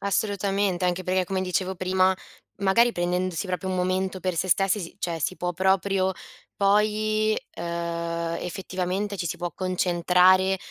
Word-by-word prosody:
Assolutamente! 200 -2 0
Anche 180 +1 0
perché, 185 0 +1
come 190 +1 -2
dicevo 185 +1 -1
prima, 185 +1 +2 0.4
magari 230 +5 +4
prendendosi 180 +1 -1
proprio 185 +1 -3
un 185 - -1
momento 185 +1 -1
per 185 -2 -2
se 185 - 0
stessi, 195 +2 +3
si 170 - -8
cioè 170 -2 -2
si 185 +4 -2
può 180 0 -2
proprio, 190 +1 +1 0.4
poi, 215 +1 +2 0.2
ehm, 170 0 -3
effettivamente, 185 +2 -3
ci 175 - -3
si 165 - -3
può 175 0 -3
concentrare 185 +1 +3
185 Hz, 145 wpm, -25 LUFS, 180-195 Hz, 0.4 s, magari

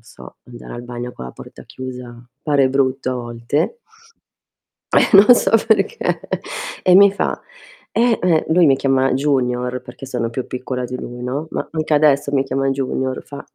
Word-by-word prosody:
non - - -29
so, 65 0 -13
andare 120 -1 -11
al 120 - -7
bagno 120 0 -7
con 65 - -9
la - - -8
porta - - -13
chiusa 125 -2 -9 0.2
pare 140 -3 +2
brutto 135 -1 0
a - - -3
volte. 120 - -2 1.2
Eh, - - +4
non 210 +5 +9
so 190 - +1 0.2
perché, 235 - +1 0.6
e 180 0 +5
mi 200 0 +7
fa: - - -2 0.5
"Eh" 235 0 +2
ehm, 170 -3 +2
lui 170 +1 +5
mi 135 - +5
chiama 135 -1 +1
Junior 125 -3 0
perché 125 +1 -11
sono 120 -3 -3
più 125 +2 -4
piccola 125 0 -4
di 125 +1 -5
lui, 120 0 -8
no- 140 +5 -3
ma - - -3
anche 155 -1 -1
adesso 145 -1 +3
mi 135 -1 +2
chiama 135 +1 -1
Junior- 130 -1 -2
fa: 140 - -8
130 Hz, 175 wpm, -19 LUFS, 125-150 Hz, 1.2 s, non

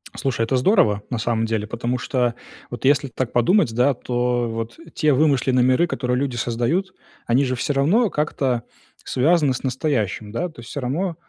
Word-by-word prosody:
Слушай, 125 -5 -1
это 120 +3 0
здорово, 120 - +3
на 120 - -1
самом 115 0 0
деле, 110 -2 -2
потому 120 +2 -2
что 125 -3 0 0.4
вот 120 - -7
если 140 -1 +3
так 125 -1 -3
подумать, 125 - +3
да, 130 +4 +3
то 120 -1 -1
вот 115 +1 -5 0.2
те 155 -2 +3
вымышленные 130 -3 +3
миры, 130 +7 +3
которые 125 -7 -2
люди 135 -2 -1
создают, 120 +12 -1 0.3
они 130 +4 +3
же 130 0 -1
все 145 +4 -1
равно 190 - +3
как-то 135 -6 -1 0.4
связаны 150 +1 +2
с 125 - -5
настоящим, 125 - -1
да. 175 +10 -2
То 135 -7 -13
есть 115 - -12
всё 145 - -5
равно, 165 +8 -2
125 Hz, 180 wpm, -22 LUFS, 120-145 Hz, 0.4 s, здорово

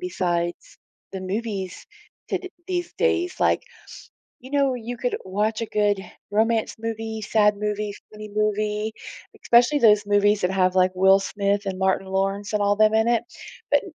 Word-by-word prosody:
besides 175 - -2 0.4
the 190 - -5
movies 195 -1 -4 0.4
to - - 0
d 370 - -9 0.2
these 355 -2 -3
days? 370 -6 +1
Like, - - +2 0.8
you 260 +2 -13
know, 275 -2 +2
you 240 0 -6
could 245 +1 -2
watch 210 +4 -1
a - - -1
good 205 -2 +1 0.3
romance 220 +2 +1
movie, 225 -1 -4
sad 210 -1 +3
movie, 210 0 -2 0.2
funny 215 0 -9
movie, 215 0 0 0.5
especially 245 +5 +4
those 210 -3 +5
movies 205 0 +3
that 180 - +1
have, 185 -1 +2
like, 185 0 +4
Will 190 +1 +5
Smith 200 +1 -1
and 190 -1 -4
Martin 190 0 +1
Lawrence 195 +2 -2
and 210 - +1
all 205 0 +2
them 215 +1 +4
in 220 +1 +3
it. 235 -1 +2 0.5
But 290 - +4
210 Hz, 165 wpm, -23 LUFS, 195-230 Hz, 0.8 s, those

